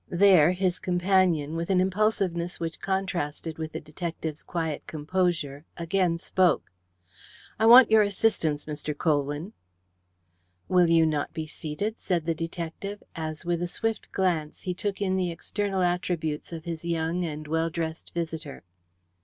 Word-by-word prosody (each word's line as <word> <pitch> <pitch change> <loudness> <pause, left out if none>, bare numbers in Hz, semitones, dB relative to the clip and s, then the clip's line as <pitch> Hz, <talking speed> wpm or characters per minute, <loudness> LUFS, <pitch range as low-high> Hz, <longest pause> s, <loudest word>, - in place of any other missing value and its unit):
There 180 -3 +6
his 185 -1 0
companion, 175 -4 +2
with 165 +2 -3
an 190 -1 +4
impulsiveness 185 -3 0
which 165 -1 -4
contrasted 175 -5 -2
with 160 0 -4
the - - -3
detective's 160 0 -5
quiet 165 -4 -3
composure, 155 -2 -1
again 170 0 +1
spoke: 180 - +1 0.9
"I 220 - +4
want 240 0 +9
your 220 -1 +7
assistance, 200 -7 +1
Mr. 150 -1 -4
Colwyn." 145 +5 0 1.1
"Will 180 -2 +4
you 165 -1 +5
not 150 -2 -1
be 160 - -3
seated?" 160 +8 -4
said 170 -4 -1
the 165 - +1
detective, 170 +5 -5
as 155 0 -5
with 175 -1 0
a 175 - 0
swift 225 +5 -3
glance 170 -5 -1
he 180 - -1
took 200 +2 -2
in 190 -1 +1
the 180 -2 0
external 195 +3 -2
attributes 175 -4 -1
of 165 -1 -7
his 165 -1 -4
young 170 +1 -1
and 155 -2 -5
well 160 +2 +1
dressed 165 0 -4
visitor. 160 -3 -4
170 Hz, 145 wpm, -27 LUFS, 160-185 Hz, 1.1 s, want